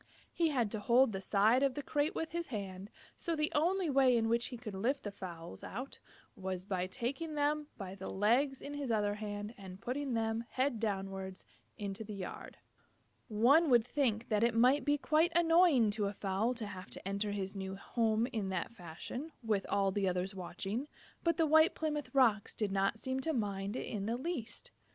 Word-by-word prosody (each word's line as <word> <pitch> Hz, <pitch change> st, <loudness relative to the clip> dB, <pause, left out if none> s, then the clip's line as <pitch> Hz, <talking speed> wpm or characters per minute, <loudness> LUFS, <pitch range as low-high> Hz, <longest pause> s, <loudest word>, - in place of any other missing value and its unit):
He 335 Hz, -, +2 dB
had 245 Hz, -9 st, +1 dB
to 220 Hz, -, -2 dB
hold 240 Hz, +4 st, +4 dB
the 195 Hz, -2 st, -4 dB
side 215 Hz, +6 st, +4 dB
of 275 Hz, -2 st, +2 dB
the 290 Hz, -, -4 dB
crate 290 Hz, +2 st, 0 dB
with 325 Hz, -, -2 dB
his 340 Hz, 0 st, -3 dB
hand, 195 Hz, -4 st, -5 dB, 0.3 s
so 335 Hz, -, -2 dB
the 300 Hz, 0 st, 0 dB
only 350 Hz, +4 st, +2 dB
way 265 Hz, -4 st, +4 dB
in 225 Hz, -1 st, +1 dB
which 235 Hz, +1 st, +2 dB
he 245 Hz, -, -7 dB
could 225 Hz, -3 st, -7 dB
lift 250 Hz, +9 st, 0 dB
the 205 Hz, -, -4 dB
fowls 170 Hz, -, -8 dB
out 255 Hz, +6 st, -6 dB, 0.4 s
was 185 Hz, -1 st, -4 dB
by 185 Hz, -2 st, -1 dB
taking 275 Hz, -, -3 dB
them 295 Hz, +1 st, +1 dB
by 190 Hz, -3 st, -6 dB
the 195 Hz, -1 st, -7 dB
legs 250 Hz, +7 st, +2 dB
in 285 Hz, -, -6 dB
his 285 Hz, -4 st, -3 dB
other 205 Hz, -2 st, +2 dB
hand 205 Hz, +1 st, -5 dB
and 190 Hz, -1 st, -9 dB
putting 260 Hz, +3 st, -2 dB
them, 225 Hz, 0 st, 0 dB
head 260 Hz, -3 st, +1 dB
downward, 195 Hz, -3 st, -3 dB, 0.4 s
into 200 Hz, +1 st, -4 dB
the 210 Hz, -1 st, -7 dB
yard. 190 Hz, -2 st, -7 dB, 0.7 s
One 265 Hz, +10 st, +5 dB
would 240 Hz, -3 st, +5 dB
think 245 Hz, -5 st, 0 dB
that 215 Hz, -1 st, +2 dB
it 235 Hz, -1 st, +3 dB
might 255 Hz, +5 st, +5 dB
be 290 Hz, 0 st, +3 dB
quite 315 Hz, +4 st, +2 dB
annoying 330 Hz, -, +5 dB
to 205 Hz, -1 st, 0 dB
a 200 Hz, -, -3 dB
fowl 205 Hz, +5 st, 0 dB
to 230 Hz, -2 st, -4 dB
have 190 Hz, -1 st, -8 dB
to -, -, -6 dB
enter 200 Hz, +1 st, -1 dB
his 195 Hz, -1 st, -3 dB
new 190 Hz, 0 st, -4 dB
home 220 Hz, +2 st, +1 dB
in 210 Hz, -4 st, -1 dB
that 190 Hz, -, -2 dB
fashion, 225 Hz, -, -7 dB
with 210 Hz, -4 st, 0 dB
all 195 Hz, -1 st, +2 dB
the 195 Hz, -1 st, +1 dB
others 180 Hz, +2 st, -2 dB
watching, 195 Hz, +7 st, -4 dB, 0.4 s
but 335 Hz, -2 st, +2 dB
the 325 Hz, -, +4 dB
White 315 Hz, +3 st, +5 dB
Plymouth 300 Hz, -2 st, -2 dB
Rocks 225 Hz, -6 st, +3 dB
did 210 Hz, -3 st, -1 dB
not 195 Hz, +2 st, +1 dB
seem 260 Hz, +3 st, -2 dB
to 320 Hz, +4 st, -1 dB
mind 200 Hz, -3 st, -2 dB
it -, -, -3 dB
in 205 Hz, -2 st, -3 dB
the 230 Hz, +2 st, 0 dB
least. 265 Hz, -4 st, -5 dB
225 Hz, 200 wpm, -34 LUFS, 195-275 Hz, 0.7 s, One